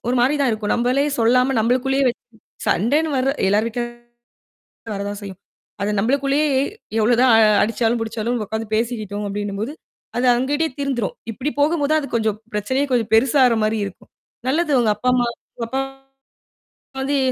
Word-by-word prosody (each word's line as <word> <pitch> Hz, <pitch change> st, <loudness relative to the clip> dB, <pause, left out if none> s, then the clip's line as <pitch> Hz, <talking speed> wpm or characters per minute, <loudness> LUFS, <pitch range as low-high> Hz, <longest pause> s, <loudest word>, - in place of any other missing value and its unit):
ஒரு 250 Hz, -, +1 dB
மாரி 265 Hz, +4 st, +3 dB
தான் 270 Hz, -, +3 dB
இருக்கும். 215 Hz, -1 st, -1 dB
நம்மளே 250 Hz, +4 st, +1 dB
சொல்லாம 250 Hz, +3 st, +3 dB
நம்மளுக்குள்ள்யே 260 Hz, +4 st, +1 dB
வச்சு 240 Hz, -, -5 dB, 0.4 s
சண்டைனு 295 Hz, -, +2 dB
வர்ற 260 Hz, +1 st, +2 dB, 0.2 s
எல்லார் 210 Hz, +3 st, +2 dB
வீட்லயும் 240 Hz, +1 st, -6 dB, 0.9 s
வரத்தான் 200 Hz, +1 st, -4 dB
செய்யும். 195 Hz, -2 st, -9 dB, 0.4 s
அது 205 Hz, +1 st, 0 dB
நம்மளுக்குள்ளயே 275 Hz, +6 st, +1 dB, 0.5 s
எவ்ளோதான் 240 Hz, +3 st, +4 dB, 0.3 s
அடிச்சாலும், 230 Hz, +2 st, +1 dB
புடிச்சாலும் 225 Hz, +2 st, -2 dB
உக்காந்து 220 Hz, +1 st, -4 dB
பேசிக்கிட்டோம் 215 Hz, -3 st, -2 dB
அப்படின்னும் 200 Hz, 0 st, -4 dB
போது, 235 Hz, +7 st, -3 dB, 0.4 s
அது 245 Hz, -, +1 dB
அவங்ககிட்டயே 290 Hz, +6 st, 0 dB
தீர்ந்துரும். 260 Hz, -7 st, -1 dB, 0.2 s
இப்படி 265 Hz, +7 st, -3 dB
போகும்போது 300 Hz, 0 st, +2 dB
அது 300 Hz, -, -1 dB
கொஞ்சம் 220 Hz, -2 st, 0 dB, 0.2 s
பிரச்சனையே 260 Hz, +7 st, 0 dB
கொஞ்சம் 230 Hz, -3 st, +1 dB
பெருசாகுற 250 Hz, +1 st, +4 dB
மாரி 215 Hz, +1 st, +1 dB
இருக்கும். 190 Hz, -, -11 dB, 0.4 s
நல்லது 310 Hz, +3 st, +1 dB
உங்க 230 Hz, -, +2 dB
அப்பா, 250 Hz, +4 st, -1 dB
அம்மா 245 Hz, -1 st, +2 dB, 0.3 s
உங்க 230 Hz, -, -3 dB
அப்பா, 265 Hz, +3 st, -1 dB
அம்மா 270 Hz, 0 st, -20 dB, 0.8 s
வந்து 280 Hz, +1 st, 0 dB
240 Hz, 150 wpm, -21 LUFS, 220-270 Hz, 0.9 s, எவ்ளோதான்